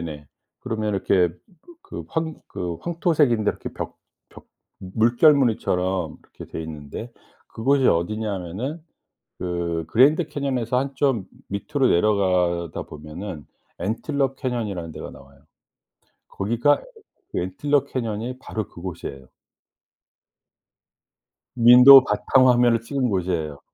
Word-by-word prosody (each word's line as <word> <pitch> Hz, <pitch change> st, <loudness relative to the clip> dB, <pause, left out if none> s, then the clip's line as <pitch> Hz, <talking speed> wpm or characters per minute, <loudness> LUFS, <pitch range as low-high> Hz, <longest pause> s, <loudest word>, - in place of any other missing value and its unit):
네네. 75 Hz, -3 st, -8 dB, 0.3 s
그러면 110 Hz, -2 st, -2 dB
이렇게 95 Hz, -2 st, +2 dB, 0.5 s
그 -, -, -8 dB
황 160 Hz, -1 st, -2 dB
그 85 Hz, -2 st, -4 dB
황토색인데 155 Hz, -, +1 dB
이렇게 -, -, -8 dB
벽 -, -, -6 dB, 0.3 s
벽 -, -, -16 dB, 0.3 s
물결무늬처럼 110 Hz, -, +2 dB
이렇게 -, -, -12 dB
돼 80 Hz, -, -5 dB
있는데 80 Hz, +8 st, -8 dB, 0.4 s
그곳이 135 Hz, +3 st, +2 dB
어디냐 105 Hz, +6 st, 0 dB
하면은 100 Hz, -, -5 dB, 0.6 s
그 85 Hz, -2 st, -3 dB
Grand 150 Hz, +8 st, +4 dB
Canyon에서 130 Hz, -4 st, -1 dB
한 135 Hz, +1 st, -2 dB
좀 130 Hz, -10 st, +1 dB, 0.2 s
밑으로 135 Hz, +7 st, 0 dB
내려가다 90 Hz, -4 st, +1 dB
보면은 75 Hz, +1 st, -8 dB, 0.4 s
Antelope 135 Hz, -, -1 dB
Canyon이라는 105 Hz, -, -3 dB
데가 -, -, -8 dB
나와요. 70 Hz, 0 st, -17 dB, 0.9 s
거기가 120 Hz, +8 st, +1 dB, 0.5 s
그 -, -, -2 dB
Antelope 140 Hz, +11 st, -1 dB
Canyon이 115 Hz, 0 st, -3 dB
바로 110 Hz, -5 st, -5 dB
그곳이에요. 80 Hz, -7 st, -8 dB, 2.3 s
윈도우 125 Hz, +3 st, +9 dB
바탕 130 Hz, -1 st, +3 dB
화면을 120 Hz, -2 st, +4 dB
찍은 125 Hz, +2 st, -1 dB
곳이에요. 85 Hz, -7 st, -2 dB
110 Hz, 330 characters per minute, -23 LUFS, 90-130 Hz, 2.3 s, 윈도우